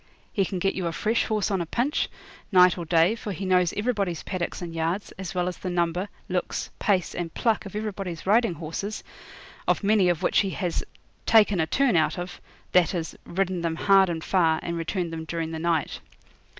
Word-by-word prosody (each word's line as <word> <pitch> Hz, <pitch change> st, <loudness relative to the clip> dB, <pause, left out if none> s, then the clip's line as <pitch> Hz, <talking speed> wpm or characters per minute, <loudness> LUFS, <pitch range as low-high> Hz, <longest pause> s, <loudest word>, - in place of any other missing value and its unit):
He 195 Hz, -, +2 dB
can 185 Hz, -, -3 dB
get 195 Hz, +2 st, +1 dB
you 185 Hz, -2 st, -2 dB
a -, -, -1 dB
fresh 220 Hz, +7 st, 0 dB
horse 215 Hz, -1 st, 0 dB
on 190 Hz, -2 st, +1 dB
a -, -, -2 dB
pinch, 255 Hz, -, 0 dB, 0.4 s
night 180 Hz, -2 st, +6 dB
or 175 Hz, -, -5 dB
day, 165 Hz, +4 st, +4 dB
for 225 Hz, -2 st, -5 dB
he 190 Hz, +3 st, -5 dB
knows 180 Hz, -2 st, +3 dB
everybody's 205 Hz, -6 st, -1 dB
paddocks 180 Hz, -3 st, -3 dB
and 175 Hz, -3 st, -6 dB
yards, 165 Hz, +5 st, -2 dB
as 190 Hz, -2 st, -7 dB
well 180 Hz, 0 st, +1 dB
as 180 Hz, -, -3 dB
the 185 Hz, -, -4 dB
number, 175 Hz, +2 st, 0 dB, 0.2 s
looks, 180 Hz, -1 st, -2 dB
pace, 190 Hz, -4 st, +1 dB
and 170 Hz, -2 st, -4 dB
pluck 225 Hz, -3 st, +1 dB
of 195 Hz, -, -10 dB
everybody's 195 Hz, -6 st, -4 dB
riding 215 Hz, -1 st, +3 dB
horses 170 Hz, +7 st, -5 dB, 0.6 s
of -, -, +2 dB
many 200 Hz, -3 st, +4 dB
of 175 Hz, -3 st, 0 dB
which -, -, +3 dB
he 195 Hz, -, +1 dB
has 180 Hz, -4 st, -1 dB, 0.4 s
'taken 210 Hz, -4 st, +5 dB
a 160 Hz, -, +1 dB
turn' 260 Hz, +4 st, +2 dB
out 155 Hz, +1 st, +2 dB
of 175 Hz, 0 st, -6 dB, 0.3 s
that 180 Hz, 0 st, +4 dB
is, 165 Hz, -2 st, -3 dB
ridden 185 Hz, 0 st, -1 dB
them 165 Hz, -1 st, -1 dB
hard 195 Hz, +1 st, +5 dB
and 165 Hz, -2 st, -3 dB
far, 165 Hz, -4 st, +2 dB
and 170 Hz, -, -3 dB
returned 170 Hz, +1 st, -2 dB
them 160 Hz, 0 st, -4 dB
during 165 Hz, 0 st, -3 dB
the 160 Hz, -, -4 dB
night. 165 Hz, -2 st, 0 dB
180 Hz, 205 wpm, -26 LUFS, 170-200 Hz, 0.6 s, night